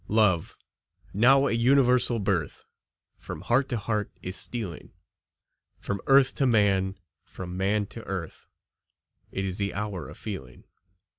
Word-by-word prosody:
Love, 100 -6 +2 0.6
now 135 +6 +5
a - - +1
universal 125 0 +3
birth, 95 -8 -2 0.5
From - - -7
heart 130 +3 +1
to 120 - 0
heart 105 -1 -2
is 95 +1 -4
stealing, 105 -9 -5 0.9
From 100 -1 -4
earth 135 -1 +5
to 135 - +2
man, 100 -4 +2 0.3
from 90 -1 -8
man 100 +2 +1
to 115 - -8
earth; 95 -4 -6 0.8
It 95 - -2
is 95 0 -1
the 100 -3 -2
hour 100 -3 -4
of - - -11
feeling. 65 - -8
105 Hz, 135 wpm, -27 LUFS, 95-120 Hz, 0.9 s, now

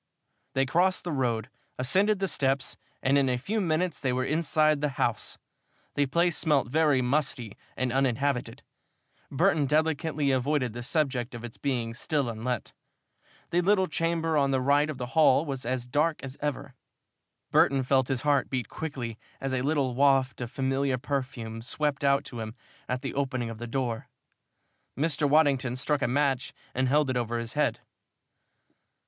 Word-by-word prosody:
They 135 0 +3
crossed 180 +8 +2
the 175 - -3
road, 125 -4 -1 0.3
ascended 195 +12 +2
the 195 0 -1
steps, 135 -5 0 0.3
and 140 +2 +4
in 135 -2 +2
a 125 - +1
few 210 - -2
minutes 170 -1 0
they 130 - +1
were 130 0 0
inside 155 -1 +2
the 150 - +1
house. 120 - -1 0.6
The 145 -1 +1
place 170 +5 +2
smelt 150 -6 +2
very 150 -2 +3
musty 130 -4 0 0.2
and 130 -1 -1
uninhabited. 135 0 0 0.7
Burton 155 -1 +2
delicately 155 -1 +1
avoided 130 -2 0
the 120 - -6
subject 125 -2 -1
of 120 - -8
its 120 -2 -8
being 120 -5 -1
still 140 +2 -1
unlet. 115 +1 -3 0.8
The 175 - +3
little 190 +1 +3
chamber 165 -1 0
on 140 -1 +3
the 135 -1 +2
right 145 +3 +3
of 150 - -4
the 125 - -3
hall 155 -2 +5
was 135 -5 -5
as 125 -1 -1
dark 150 +5 0
as 135 0 -6
ever. 145 -2 -3 0.8
Burton 135 -1 +4
felt 130 0 +2
his 130 -3 -1
heart 145 -2 +2
beat 125 -5 -2
quickly 125 -8 -5 0.2
as 135 -1 -2
a 130 - 0
little 140 -2 +1
waft 135 -1 +3
of 120 - -3
familiar 135 +1 0
perfume 125 -4 -4
swept 145 +4 -2
out 140 0 +3
to 120 - -7
him 110 0 -6 0.3
at 125 0 -2
the - - -3
opening 130 -4 -2
of 110 - -9
the 120 - -5
door. 120 -2 -2 0.9
Mr. 145 0 +1
Waddington 140 -5 +3
struck 145 +2 0
a - - +2
match 135 0 0 0.2
and 130 0 +1
held 145 -1 +3
it 125 - -1
over 120 -1 -1
his 115 0 -4
head. 150 0 0
135 Hz, 170 wpm, -28 LUFS, 125-150 Hz, 0.9 s, hall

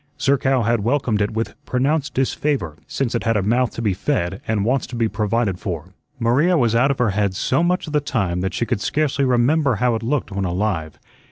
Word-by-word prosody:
Zerkow 135 -2 +2
had 115 +1 +2
welcomed 120 -3 +1
it 100 - +1
with 110 +1 -3
pronounced 140 +2 0
disfavor, 135 - -1
since 135 -4 -2
it 120 - -1
had 115 0 +2
a 100 - 0
mouth 120 +4 +2
to 115 - -4
be 105 -3 +2
fed 95 -4 -2
and 105 -2 0
wants 130 +3 +1
to 120 - -7
be 115 -1 +1
provided 105 -2 -1
for. 90 -2 -5 0.2
Maria 135 +9 +3
was 120 -5 +2
out 125 +4 +3
of 140 - 0
her 125 -5 +2
head 100 -1 0
so 130 - +1
much 180 +2 +1
of 155 - -8
the 150 - +3
time 95 -11 -1
that 95 +1 -2
she 120 - 0
could 115 -4 -2
scarcely 145 0 0
remember 130 +2 +2
how 120 +3 +1
it 110 - -2
looked 130 +1 -1
when 100 0 -2
alive. 90 -4 -2
115 Hz, 225 wpm, -21 LUFS, 100-135 Hz, 0.2 s, Maria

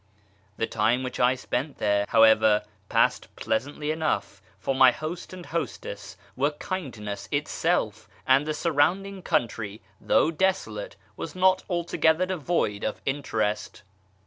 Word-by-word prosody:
The - - +1
time 115 +4 +1
which 125 - -5
I 125 +1 +4
spent 130 +3 -3
there, 100 -1 +1
however, 110 -1 +5 0.3
passed - - +2
pleasantly 145 +6 -2
enough, 160 0 -2 0.2
for 135 - -1
my 130 -1 +7
host 160 +6 -6
and 185 -2 -9
hostess 170 0 -5 0.2
were 140 +3 +2
kindness 135 - -5
itself, 145 - -1 0.2
and 135 +3 +4
the 155 - -1
surround 165 +5 +2
ing 195 -1 -8
country, 110 - -1 0.2
though 160 - +3
desolate, 190 - -1 0.2
was - - -6
not 185 0 +3
altogether 170 -1 +2
devoid 170 - -1
of 110 - -2
interest. 110 -8 -2
145 Hz, 130 wpm, -26 LUFS, 110-170 Hz, 0.3 s, my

